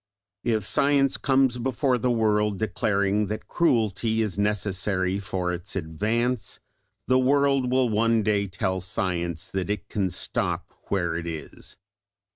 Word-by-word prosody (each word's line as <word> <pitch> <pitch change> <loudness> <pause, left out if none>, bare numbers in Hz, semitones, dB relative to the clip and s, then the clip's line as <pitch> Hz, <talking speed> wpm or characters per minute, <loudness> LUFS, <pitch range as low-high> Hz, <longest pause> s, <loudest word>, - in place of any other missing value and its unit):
If 110 -3 +1
Science 140 +5 +3
comes 130 -3 +2
before 130 +1 +1
the 125 - 0
world 105 -3 +2
declaring 105 -1 0
that 105 +2 -5
cruelty 115 - +1
is 105 -5 -3
necessary 100 -2 0
for 95 -2 -2
its 90 +3 -6
advance, 105 +7 -1 0.5
the 130 0 +3
world 135 0 +3
will 130 -1 +3
one 115 0 +2
day 100 -1 +1
tell 95 0 -2
Science 90 -3 -2
that 95 0 -3
it 105 - -3
can 100 -3 0
stop 90 - -2
where 85 -4 0
it 85 0 -4
is. 80 -2 -8
105 Hz, 135 wpm, -25 LUFS, 95-120 Hz, 0.5 s, Science